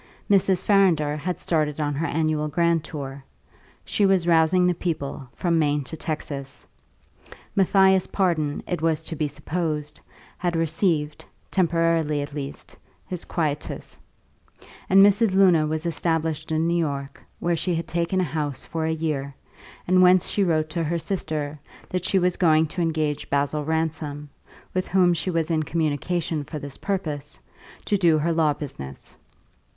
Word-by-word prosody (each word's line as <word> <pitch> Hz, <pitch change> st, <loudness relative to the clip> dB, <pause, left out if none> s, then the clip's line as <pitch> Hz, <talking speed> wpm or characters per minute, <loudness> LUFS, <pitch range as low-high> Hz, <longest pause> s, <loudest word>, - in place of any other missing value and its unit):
Mrs. 190 Hz, -2 st, +3 dB
Farrinder 175 Hz, -8 st, +3 dB
had 170 Hz, +3 st, -3 dB
started 155 Hz, -4 st, -1 dB
on 145 Hz, -1 st, 0 dB
her 160 Hz, +4 st, -1 dB
annual 155 Hz, -1 st, 0 dB
grand 170 Hz, +1 st, +1 dB
tour; 140 Hz, -3 st, -7 dB, 0.6 s
she 210 Hz, -, 0 dB
was 195 Hz, -3 st, +3 dB
rousing 170 Hz, +2 st, +4 dB
the 180 Hz, -, +3 dB
people, 155 Hz, -6 st, -4 dB
from 170 Hz, +6 st, 0 dB
Maine 145 Hz, -2 st, +1 dB
to 150 Hz, -, -7 dB
Texas; 145 Hz, -4 st, -5 dB, 0.9 s
Matthias 190 Hz, -1 st, +4 dB
Pardon 160 Hz, -7 st, 0 dB
(it 175 Hz, -, -2 dB
was 160 Hz, -1 st, +1 dB
to 160 Hz, -, -3 dB
be 150 Hz, 0 st, -1 dB
supposed) 150 Hz, 0 st, -3 dB, 0.4 s
had 175 Hz, -1 st, -1 dB
received, 160 Hz, -2 st, 0 dB, 0.3 s
temporarily 165 Hz, -4 st, +2 dB
at 145 Hz, -, -8 dB
least, 145 Hz, -1 st, -7 dB, 0.3 s
his 180 Hz, -2 st, -5 dB
quietus; 150 Hz, -3 st, -3 dB, 0.9 s
and 195 Hz, +1 st, +8 dB
Mrs. 205 Hz, 0 st, +3 dB
Luna 180 Hz, -5 st, +5 dB
was 155 Hz, +2 st, -2 dB
established 160 Hz, -1 st, -1 dB
in 160 Hz, +1 st, +1 dB
New 170 Hz, -, +1 dB
York, 140 Hz, -3 st, -3 dB, 0.2 s
where 175 Hz, 0 st, +1 dB
she 175 Hz, +1 st, -1 dB
had 165 Hz, -, -3 dB
taken 170 Hz, +2 st, 0 dB
a -, -, +2 dB
house 150 Hz, -4 st, -3 dB
for 160 Hz, -1 st, -3 dB
a -, -, +1 dB
year, 145 Hz, -4 st, -3 dB, 0.5 s
and 185 Hz, +1 st, +5 dB
whence 185 Hz, 0 st, +5 dB
she 205 Hz, -, +1 dB
wrote 155 Hz, -3 st, +1 dB
to 170 Hz, 0 st, -1 dB
her 165 Hz, +2 st, -1 dB
sister 155 Hz, -4 st, -3 dB, 0.3 s
that 180 Hz, -1 st, -2 dB
she 195 Hz, -, +2 dB
was 180 Hz, -1 st, +2 dB
going 160 Hz, -2 st, +4 dB
to 175 Hz, +3 st, -4 dB
engage 155 Hz, -3 st, -1 dB
Basil 145 Hz, +2 st, 0 dB
Ransom 155 Hz, -2 st, -3 dB, 0.4 s
(with 185 Hz, 0 st, -1 dB
whom 180 Hz, -2 st, +4 dB
she 170 Hz, +2 st, -2 dB
was 165 Hz, -1 st, 0 dB
in 160 Hz, -1 st, +2 dB
communication 155 Hz, +1 st, -1 dB
for 150 Hz, -, -7 dB
this 140 Hz, -2 st, -7 dB
purpose) 160 Hz, -8 st, -3 dB, 0.5 s
to 205 Hz, -, +2 dB
do 170 Hz, -4 st, +4 dB
her 165 Hz, +2 st, +1 dB
law 160 Hz, -2 st, +3 dB
business. 70 Hz, -, -8 dB
160 Hz, 155 wpm, -24 LUFS, 150-175 Hz, 0.9 s, and